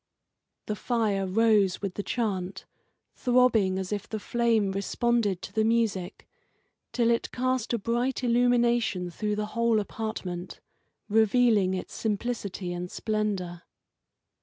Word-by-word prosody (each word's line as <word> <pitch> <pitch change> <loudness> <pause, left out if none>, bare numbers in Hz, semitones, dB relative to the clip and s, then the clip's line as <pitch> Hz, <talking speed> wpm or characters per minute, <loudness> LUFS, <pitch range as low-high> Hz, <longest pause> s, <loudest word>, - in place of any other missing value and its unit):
The 210 - -2
fire 210 -3 0
rose 205 -2 +3
with 195 -2 -2
the 205 - -3
chant, 195 -5 -3 0.5
throbbing 245 -7 +3
as 190 0 -4
if 205 -1 -3
the 220 - -3
flame 225 -3 +1
responded 205 0 0
to 190 - -8
the 220 +1 +2
music, 220 -5 0 0.6
until 235 -1 +2
it 230 - 0
cast 255 -2 -1
a 235 - +1
bright 240 +4 -1
illumination 235 -6 +2
through 210 +4 -2
the 210 0 -2
whole 235 -1 +2
apartment, 195 -4 -5 0.5
revealing 220 -3 +3
its 185 - -6
simplicity 205 -4 -3
and 175 0 -5
splendour. 200 -6 -2
215 Hz, 125 wpm, -27 LUFS, 190-235 Hz, 0.6 s, rose